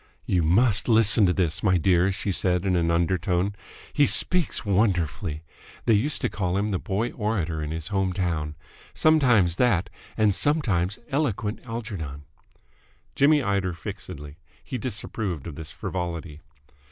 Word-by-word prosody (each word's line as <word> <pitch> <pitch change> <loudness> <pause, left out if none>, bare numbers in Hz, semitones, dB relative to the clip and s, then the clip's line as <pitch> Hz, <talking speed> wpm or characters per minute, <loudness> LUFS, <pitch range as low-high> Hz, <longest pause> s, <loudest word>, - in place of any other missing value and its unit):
"You 90 - +1
must 105 +8 +3
listen 110 -2 +4
to - - +3
this, 90 -1 -1
my 95 -4 +3
dear," 90 +2 +3
she 100 +1 -3
said 90 0 +1
in 95 -2 +1
an 85 -1 +1
undertone. 90 +2 0 0.4
"He 145 -1 +4
speaks 180 -9 +3
wonderfully! 90 -5 0 0.4
They 115 - +4
used 125 +9 +1
to - - +1
call 90 0 -2
him 105 +2 0
the 95 -3 -1
Boy 110 +5 -2
Orator 95 -8 -2
in 75 - -4
his 80 0 -4
home 95 -2 0
town. 85 -5 -2 0.4
Sometimes 125 - +3
that, 105 -7 +1 0.3
and 105 -2 +3
sometimes 105 - +1
Eloquent 115 -7 -1
Algernon!" 100 -12 -6 0.9
Jimmy 145 0 +4
eyed 100 -2 0
her 90 -1 -2
fixedly. 85 -6 -8 0.2
He 130 -3 -5
disapproved 105 - -4
of 85 - -6
this 75 +2 -8
frivolity. 85 -4 -5
95 Hz, 150 wpm, -25 LUFS, 85-110 Hz, 0.9 s, listen